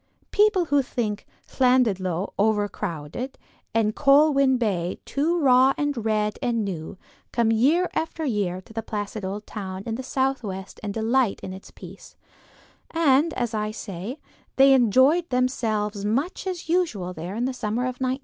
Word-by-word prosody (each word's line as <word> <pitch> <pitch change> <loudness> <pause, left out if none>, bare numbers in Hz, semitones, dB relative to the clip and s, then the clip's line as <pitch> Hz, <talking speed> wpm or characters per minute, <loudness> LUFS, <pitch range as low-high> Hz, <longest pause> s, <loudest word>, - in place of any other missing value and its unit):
People 415 -4 +3
who 285 -3 +3
think 225 -6 -3 0.2
Llandudno 205 -9 +1
overcrowded 205 - -2 0.3
and 215 -1 +1
Colwyn 275 -2 +4
Bay 190 -7 -1
too 325 +5 0
raw 260 -2 +5
and 290 -6 -1
red 215 -1 0
and 230 -3 0
new, 175 -3 -5 0.3
come 230 -2 +2
year 295 +11 +3
after 320 0 -2
year 200 -7 -1
to 220 - -16
the 225 - -3
placid 210 -1 -5
old 200 +3 -4
town 190 -2 -6
in 230 - -3
the 240 - -3
southwest 255 -8 -3
and 210 - -4
delight 225 +1 +1
in 185 - -5
its 190 - -11
peace; - - -13 0.7
and 315 -1 +3
as 240 -2 -2
I 215 -1 -1
say, 215 - -6 0.4
they 270 0 +7
enjoyed 265 - +4
themselves 220 -5 -1
much 275 - -1
as 360 -3 -4
usual 315 - 0
there 175 +4 -6
in 235 +2 -1
the 260 - -1
summer 225 0 -2
of 255 0 -4
1915. 260 +1 0
230 Hz, 155 wpm, -24 LUFS, 205-270 Hz, 0.7 s, they